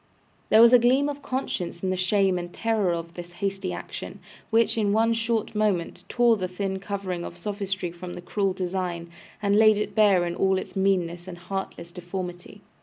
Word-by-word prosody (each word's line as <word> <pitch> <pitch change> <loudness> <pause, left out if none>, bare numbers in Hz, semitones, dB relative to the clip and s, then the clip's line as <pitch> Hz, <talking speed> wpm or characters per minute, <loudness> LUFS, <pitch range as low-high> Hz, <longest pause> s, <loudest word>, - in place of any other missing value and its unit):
There 220 +1 +7
was 235 +1 +7
a 250 - +9
gleam 260 +4 +3
of 285 0 -6
conscience 190 -11 -3
in 185 - +1
the - - 0
shame 185 0 +2
and 175 0 -6
terror 220 -4 0
of 170 0 -4
this 175 0 -9
hasty 195 0 -3
action, - - -7 0.3
which, 230 0 +3
in 205 -3 +1
one 225 +1 +3
short 230 -1 -1
moment, 210 -5 -1
tore 240 -2 +4
the 185 -2 -2
thin 190 +1 -3
covering 195 -3 -4
of 170 - -7
sophistry 195 -2 -3
from 175 +1 -8
the - - -7
cruel 195 +1 -1
design, 180 -2 -3 0.3
and 200 0 +3
laid 215 0 +6
it 210 - -2
bare 200 -5 +4
in 170 - -2
all 190 +1 +2
its - - -6
meanness 180 -3 0
and 180 -2 -7
heartless 180 -1 -6
deformity. 180 0 -7
190 Hz, 190 wpm, -25 LUFS, 175-215 Hz, 0.3 s, a